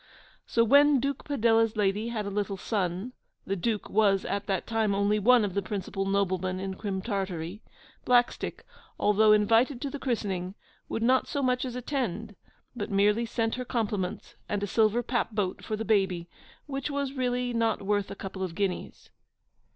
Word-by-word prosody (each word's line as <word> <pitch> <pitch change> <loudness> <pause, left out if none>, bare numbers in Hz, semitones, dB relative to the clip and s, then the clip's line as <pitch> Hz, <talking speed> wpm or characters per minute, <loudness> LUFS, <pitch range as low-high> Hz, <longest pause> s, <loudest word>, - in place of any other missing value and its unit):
So 230 - +3
when 285 +3 +6
Duke 275 +1 -2
Padella's 225 -5 +2
lady 205 +2 +1
had 225 -3 -3
a 200 - -4
little 200 -1 -2
son 190 +3 -2 0.3
(the 195 - -1
Duke 210 +3 -2
was 200 -2 +2
at 200 0 -3
that 195 -2 -1
time 220 -3 0
only 200 +1 +2
one 240 +1 +5
of 195 - -4
the 200 - 0
principal 195 0 -3
noblemen 185 -2 0
in 190 0 -3
Crim 190 -1 -4
Tartary), 195 -3 -3 0.4
Blackstick, 245 -1 +1 0.4
although 210 +1 +4
invited 225 +5 +4
to 280 - -3
the 285 - -5
christening, 195 -8 -2 0.3
would 225 - -2
not 255 +2 +3
so 285 - -2
much 250 0 +1
as 250 -1 -5
attend; 230 - -3 0.4
but 215 -4 -4
merely 210 +3 +2
sent 225 0 -1
her 250 - -3
compliments 210 -7 -3 0.2
and 205 -1 -1
a - - +2
silver 220 +3 +2
papboat 215 -6 -1
for 215 - -2
the 220 +1 -4
baby, 190 -5 +1 0.4
which 275 -1 -4
was 280 -1 -2
really 250 -2 -1
not 230 -3 0
worth 205 0 0
a - - -6
couple 195 -1 -7
of 180 -3 -3
guineas. 195 -2 -3
210 Hz, 175 wpm, -28 LUFS, 195-240 Hz, 0.4 s, when